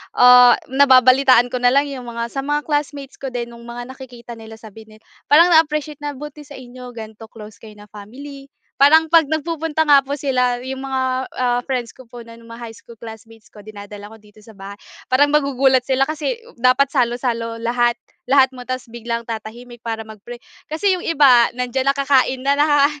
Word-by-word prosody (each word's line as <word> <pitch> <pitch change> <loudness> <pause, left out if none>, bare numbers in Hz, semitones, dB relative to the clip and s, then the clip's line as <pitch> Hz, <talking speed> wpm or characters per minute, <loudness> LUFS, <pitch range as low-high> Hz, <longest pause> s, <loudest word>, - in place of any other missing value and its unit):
ah, 250 -1 +7 0.2
nababalitaan 260 -2 +4
ko 250 - -3
na 245 +1 +2
lang 285 0 +1
yung 255 -3 -8
mga, 235 0 -5
sa 275 - -5
mga 295 +2 -2
classmates 290 -2 -4
ko 275 - -6
din 240 -2 -6
nung 235 0 -14
mga 240 +1 -8
nakikita 245 -3 -12
nila 220 0 -12
sabi 220 0 -14
nila, 215 0 -19 0.2
parang 335 +4 +5
na-appreciate 305 -2 +1
na 290 -1 -6
buti 295 +1 -11
sa 285 - -12
inyo 250 -1 -12
ganito 220 0 -10
close 215 -2 -14
kayo 215 -1 -14
na 210 0 -17
family. 275 +7 -12 0.3
Parang 315 +3 +5
kapag 330 -3 +5
nagpupunta 315 +1 -2
nga 290 -2 +5
po 275 +1 -5
sila 255 -3 0
yung 265 +1 -6
mga, 265 -1 -2 0.3
ah, 245 -1 0
friends 250 -3 -3
ko 260 - -17
po 235 0 -11
na 230 0 -15
ng 230 - -18
mga 230 +1 -11
high 230 - -8
school 235 - -16
classmates 225 0 -14
ko 210 - -16
dinadala 205 0 -11
ko 220 - -14
dito 210 -1 -21
sa 215 0 -17
bahay, 200 +1 -11 0.3
parang 290 +3 +3
magugulat 270 -3 +2
sila 265 +1 0
kasi 315 +11 -4 0.2
dapat 255 +3 +2
salo-salo 235 -3 -2
lahat 240 +1 0 0.3
lahat 265 -1 +4
mo 250 - -10
tapos 255 +1 -6
biglang 235 0 -5
tatahimik 235 +2 -9
para 225 -1 -5
mag-pray. 220 +3 -11 0.3
Kasi 370 +6 0
yung 360 - -4
iba, 270 -8 +4
nandiyan 250 +1 -2
na 275 - -9
kakain 270 -2 +1
na 280 - +3
na 290 0 +3
250 Hz, 195 wpm, -19 LUFS, 230-280 Hz, 0.3 s, ah